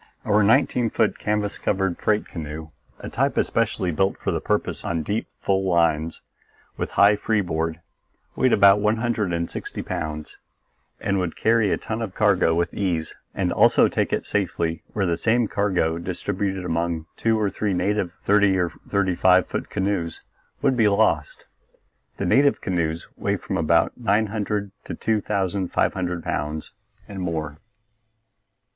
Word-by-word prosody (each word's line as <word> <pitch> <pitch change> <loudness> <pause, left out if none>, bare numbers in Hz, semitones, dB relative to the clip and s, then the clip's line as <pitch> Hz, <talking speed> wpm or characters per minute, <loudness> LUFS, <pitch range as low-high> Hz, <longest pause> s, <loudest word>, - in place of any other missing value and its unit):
Our 105 0 +3
nineteen 120 +2 +3
foot 110 0 0
canvas 105 -1 -1
covered 95 -3 -1
freight 105 0 +1
canoe, 80 -1 -7 0.3
a - - -6
type - - 0
especially 90 - 0
built 95 +4 0
for - - -2
the - - -2
purpose - - -1
on 80 -2 -2
deep, 105 +7 -2
full 95 -1 +1
lines 85 -3 +1 0.5
with - - -3
high 100 +2 +7
free 110 +1 0
board, 80 -2 -2 0.5
weighed 130 - +2
about 100 0 +6
one 105 +1 +2
hundred 110 -5 -1
and 85 0 -1
sixty - - -6
pounds 75 -1 -5 0.6
and 100 0 0
would 90 -2 -2
carry 110 -3 +2
a - - +2
ton 110 +1 -4
of 100 -4 -5
cargo 95 -6 +3
with 85 +1 0
ease 85 -5 -2 0.2
and - - 0
also - - +5
take - - -1
it - - -1
safely 85 -5 -1
where 100 -2 0
the 85 -2 0
same 115 +3 +2
cargo 90 -6 0
distributed 95 +2 -3
among 85 -1 -1
two 115 -1 +1
or 105 -2 0
three 100 0 -1
native 95 0 0
thirty 100 -1 +4
or 90 -2 0 0.2
thirty 100 -2 +1
five 90 0 +4
foot - - -4
canoes 95 -4 -2 0.4
would 135 -2 +3
be 115 -3 +4
lost. 105 - +1 0.7
The - - -2
native 140 +1 +4
canoes 85 -4 -2
weigh - - 0
from - - -5
about - - +2
nine 110 -2 +1
hundred 105 -1 -3
to - - -5
two 110 -2 0
thousand 95 -2 -1
five - - +1
hundred 90 -2 -3
pounds 75 +2 -3 0.4
and 95 -2 -7
more. 80 -4 -3
95 Hz, 165 wpm, -23 LUFS, 85-105 Hz, 0.7 s, high